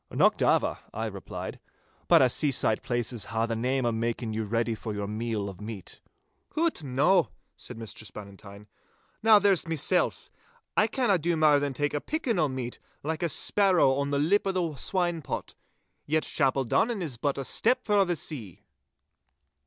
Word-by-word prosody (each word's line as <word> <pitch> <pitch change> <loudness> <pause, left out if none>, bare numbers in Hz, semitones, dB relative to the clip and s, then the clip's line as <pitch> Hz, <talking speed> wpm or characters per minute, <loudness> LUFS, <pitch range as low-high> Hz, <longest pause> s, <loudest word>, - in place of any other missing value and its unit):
'Nocht - - +2
ava,' - - +2 0.2
I - - -2
replied, - - -6 0.5
'but - - +6
a' 130 - +4
seaside 135 -7 +1
places 120 -2 -2
hae 115 0 -1
the 115 0 -2
name 130 +3 0
o' 120 - +2
making 115 0 -2
your 110 0 -2
ready 115 +2 0
for 110 0 -6
you 100 0 -3
meal 105 0 -3
of 95 -1 -9
meat.' 105 -4 -8 0.5
'Hoot, 320 - 0
no,' 145 +6 +3 0.3
said 120 - -9
Mistress 110 -1 -8
Bannatyne. 100 0 -11 0.6
'Now, 220 -1 +7
there's 200 -4 +2
mysel'. 165 +3 +2 0.6
I - - +4
canna 235 -9 +1
do 170 +1 0
mair 150 -2 +5
than 140 -2 -2
tak' 145 +1 -1
a 145 - -1
pickin' 260 - -1
o' 155 - +3
meat, 130 -2 -5 0.2
like 160 +2 -3
a 170 - 0
sparrow 185 -3 +3
on 140 +1 -1
the 140 - 0
lip 190 +8 +2
o' - - +2
the 175 -4 -1
swinepot. 175 - -2 0.5
Yet 155 +1 +1
Chapeldonnan 140 - +1
is 140 -8 -4
but 140 +3 -1
a 135 - -3
step 250 - +1
frae 205 -2 +4
the 175 -2 -1
sea. 125 - -5
140 Hz, 170 wpm, -28 LUFS, 115-175 Hz, 0.6 s, Now